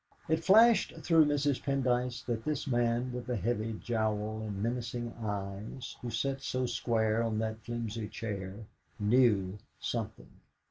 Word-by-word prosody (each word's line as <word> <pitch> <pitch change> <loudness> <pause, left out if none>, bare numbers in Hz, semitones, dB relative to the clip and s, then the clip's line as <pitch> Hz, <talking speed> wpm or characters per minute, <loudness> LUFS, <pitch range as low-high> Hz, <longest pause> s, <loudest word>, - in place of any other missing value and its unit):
It 160 +1 +1
flashed 225 +5 +6
through 165 -2 +6
Mrs. 145 -2 +1
Pendyce 125 -3 0
that 115 -2 -2
this 150 -3 -1
man 120 -1 +1
with 125 -1 -5
the 125 - 0
heavy 110 +2 -1
jowl 110 -1 -1
and 105 -2 -4
menacing 120 0 -2
eyes, 105 +3 -4
who 120 - -4
sat 135 +4 -1
so 130 0 -1
square 115 -2 +1
on 115 -2 0
that 110 0 -2
flimsy 115 -2 -3
chair, 100 -1 -5 0.3
knew 105 -3 +3 0.2
something. - - -4
115 Hz, 140 wpm, -32 LUFS, 110-125 Hz, 0.3 s, flashed